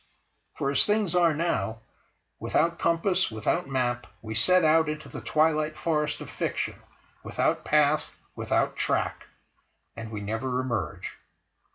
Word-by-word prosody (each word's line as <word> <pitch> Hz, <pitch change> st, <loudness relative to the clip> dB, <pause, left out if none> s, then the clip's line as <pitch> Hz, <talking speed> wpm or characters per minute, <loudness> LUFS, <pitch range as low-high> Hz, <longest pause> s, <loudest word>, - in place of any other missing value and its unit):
For, 140 Hz, -, 0 dB
as 140 Hz, -, +4 dB
things 210 Hz, -4 st, +1 dB
are 170 Hz, -3 st, +4 dB
now, 115 Hz, -, -1 dB, 0.6 s
without 170 Hz, +1 st, +1 dB
compass, 175 Hz, +3 st, +2 dB
without 110 Hz, -, -1 dB
map, 120 Hz, -2 st, -1 dB, 0.2 s
we 110 Hz, 0 st, -5 dB
set 180 Hz, +11 st, +4 dB
out 160 Hz, 0 st, +4 dB
into 155 Hz, 0 st, -5 dB
the -, -, -7 dB
twilight 155 Hz, 0 st, +1 dB
forest 150 Hz, -2 st, -1 dB
of -, -, -8 dB
fiction; -, -, -3 dB, 0.4 s
without -, -, 0 dB
path, 150 Hz, 0 st, +2 dB, 0.2 s
without -, -, 0 dB
track—and 115 Hz, -1 st, -5 dB
we 105 Hz, -2 st, -5 dB
never 115 Hz, +5 st, -2 dB
emerge. 120 Hz, -6 st, -3 dB
150 Hz, 130 wpm, -27 LUFS, 120-165 Hz, 0.6 s, as